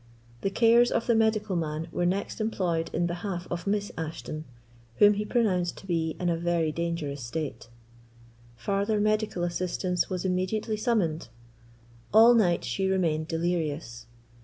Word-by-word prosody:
The 195 - 0
cares 235 +3 +5
of - - 0
the 235 - +3
medical 220 -3 +1
man 160 -1 -2
were 175 +1 0
next 195 +4 -2
employed 175 -7 -1
in 175 - 0
behalf 175 +1 -4
of 175 +2 -4
Miss 205 0 0
Ashton, 155 -1 -5 0.5
whom 205 - +6
he 210 +1 -2
pronounced 190 -7 +1
to - - -12
be 165 -3 -1
in 180 - -1
a 170 - +2
very 170 -2 0
dangerous 165 -4 -3
state. 120 -2 -5 0.9
Farther 200 - 0
medical 215 -3 0
assistance 180 +1 -1
was 185 -1 -3
immediately 185 +4 -1
summoned. 210 -8 0 0.8
All 225 +3 +8
night 185 -7 +3
she 195 -1 -1
remained 165 -5 0
delirious. 160 -8 -2
180 Hz, 145 wpm, -27 LUFS, 165-210 Hz, 0.9 s, All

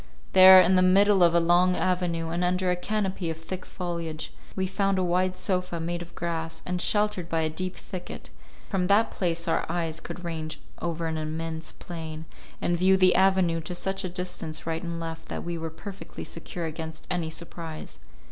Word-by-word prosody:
There, 185 0 +11
in 185 +1 +5
the 185 - +5
middle 195 +2 +5
of 170 -1 +5
a - - +6
long 175 +2 +4
avenue, 175 -3 0
and 170 +2 -1
under 180 +1 +2
a - - +2
canopy 190 -2 -2
of 160 - -3
thick 185 +3 -7
foliage, 170 -3 -4 0.2
we 190 - 0
found 195 +1 0
a 185 - +2
wide 185 +1 +1
sofa 180 -3 -1
made 170 +1 -3
of 175 0 -10
grass, 165 -1 -4
and 180 0 -2
sheltered 210 -5 +1
by 165 -1 +1
a 155 0 0
deep 185 +3 -3
thicket; 180 -2 -8 0.4
from 185 -2 0
that 205 +3 +4
place 170 -2 -1
our 165 - +1
eyes 165 -2 -1
could 180 - -8
range 160 -2 -4 0.2
over 170 -1 -2
an 160 -1 -2
immense 160 +1 -4
plain, 160 -2 -7 0.3
and 175 -1 0
view 190 +1 +5
the 185 -1 +6
avenue 190 -3 +3
to 180 +2 -6
such 195 +2 -2
a 185 - -2
distance 180 -3 -5
right 165 0 -2
and 170 -1 -4
left 165 0 -6
that - - -4
we 170 0 -3
were 165 -1 -4
perfectly 195 +5 -8
secure 170 +1 -6
against 160 0 -6
any 170 -3 -1
surprise. 160 - -7
175 Hz, 195 wpm, -27 LUFS, 165-185 Hz, 0.4 s, There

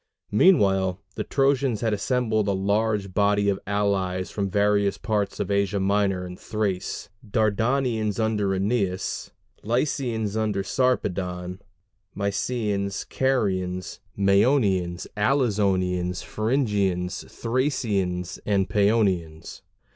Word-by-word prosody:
Meanwhile, 95 - +4
the - - -3
Trojans 135 -4 +1
had 110 -2 +1
assembled 110 -1 0
a 100 - +2
large 100 0 0
body 100 0 +2
of 95 - 0
allies 95 -3 0
from 100 -2 -2
various 100 0 +2
parts 105 -2 -2
of 105 -1 -2
Asia 100 0 +1
Minor 95 -1 +1
and 90 0 -9
Thrace: 105 -1 -3
Dardanians 110 +1 0
under 110 -2 +1
Æneas, 95 -1 -1 0.3
Lycians 115 -3 -1
under 105 -3 0
Sarpedon, 90 -8 -1 0.6
Mysians, 100 0 -2
Carians, 95 -9 -1 0.2
Mæonians, 100 -3 +2
Alizonians, 100 -7 +1
Phrygians, 100 -6 0
Thracians, 110 - -1
and 100 -2 +1
Pæonians. 95 -7 0
100 Hz, 95 wpm, -25 LUFS, 95-110 Hz, 0.6 s, Meanwhile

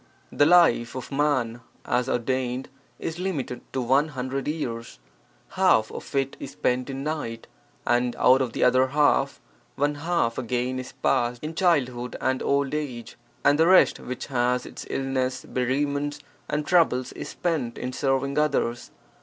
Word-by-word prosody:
The 145 - +4
life 165 -10 +4
of 130 - -6
man 135 -5 0 0.2
(as 125 +1 0
ordained) 130 +1 -1 0.3
is 165 +1 -5
limited 150 -10 -3
to 130 - -2
one 135 +5 +3
hundred 130 -1 -4
years; 120 - -4 0.5
half 180 -13 +3
of - - -8
it 135 0 0
is 135 - -7
spent 125 +1 0
in 135 0 -4
night, 145 -7 -4 0.4
and 120 0 +1
out 130 +1 +5
of 125 -3 -2
the - - 0
other 130 +1 +4
half 145 +2 +2 0.4
one 145 +2 +1
half 145 -5 -1
again 125 +1 -1
is 130 - -8
passed 120 +1 +1
in 155 +2 -4
childhood 130 -9 +1
and 130 0 0
old 140 0 +1
age; 130 -7 -4 0.3
and 145 +1 +5
the 165 - +5
rest 185 +1 +5
which 125 0 -6
has 125 -1 0
its - - -9
illness, 130 -1 -2
bereavements, 140 +3 -1 0.3
and 150 0 -1
troubles 150 -7 +2
is - - -7
spent 150 -9 -2
in 125 0 -4
serving 135 +1 0
(others). 120 -5 0
130 Hz, 155 wpm, -25 LUFS, 125-145 Hz, 0.5 s, out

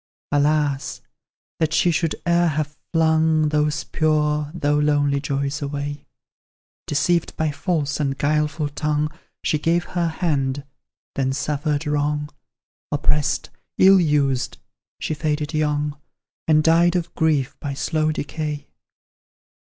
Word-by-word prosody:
Alas! 145 -1 +1 0.6
that 160 -1 +1
she 170 +2 +3
should 165 -1 0
e'er 170 0 +4
have 150 -1 -2 0.2
flung 160 -1 +3
Those 150 0 +1
pure, 150 -1 +1
though 150 -3 +1
lonely 145 -1 +2
joys 140 +1 -2
away 145 0 -4 0.8
Deceived 170 +4 +1
by 160 -1 +1
false 145 -2 -1
and 140 -2 -1
guileful 150 +1 0
tongue, 150 +1 -1 0.3
She 155 - +1
gave 170 +3 +2
her 175 -2 -1
hand, 145 -5 -1 0.5
then 135 -1 0
suffered 145 +2 -1
wrong; 150 0 -1 0.6
Oppressed, 145 0 0 0.3
ill 190 0 +7
used, 140 -5 +1 0.4
she - - -2
faded 150 0 -2
young, 150 -1 -1 0.5
And 155 -1 +4
died 170 +2 +4
of 175 -2 -2
grief 150 -4 +1
by 140 -2 -4
slow 155 +2 0
decay. 150 -1 -4
150 Hz, 120 wpm, -22 LUFS, 145-160 Hz, 0.8 s, ill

